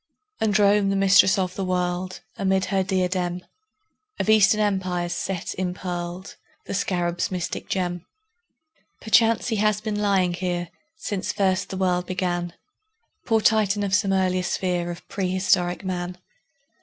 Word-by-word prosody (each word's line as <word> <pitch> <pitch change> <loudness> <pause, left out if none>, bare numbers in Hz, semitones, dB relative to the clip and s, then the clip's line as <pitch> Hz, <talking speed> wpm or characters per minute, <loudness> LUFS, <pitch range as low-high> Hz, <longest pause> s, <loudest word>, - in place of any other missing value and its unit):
And 210 -1 +2
Rome, 205 -1 +4
the 195 - +1
Mistress 195 -1 +5
of 185 -1 -1
the 195 - -4
World, 180 0 -2
Amid 190 -1 +1
her 195 - +3
diadem 180 -1 -1 0.8
Of 215 - +2
Eastern 215 0 +5
Empires 185 -4 0
set 180 0 -3
impearled 180 0 -4 0.3
The - - -5
Scarab's 175 -2 -1
mystic 180 -2 -4
gem. 175 -2 -2 0.9
Perchance 225 +2 +3
he 220 - 0
has 210 0 +2
been 210 -1 -3
lying 190 -3 +2
here 175 -1 -3 0.3
Since 205 -11 -3
first 190 -2 0
the 190 - -5
world 180 -1 0
began, 175 -2 -2 0.7
Poor 225 -2 +3
Titan 210 -2 +2
of 195 -1 -2
some 205 -1 +2
earlier 185 -1 +1
sphere 180 -1 -1
Of 175 0 -8
prehistoric 185 -1 0
Man! 180 -1 -3
185 Hz, 140 wpm, -24 LUFS, 180-200 Hz, 0.9 s, Mistress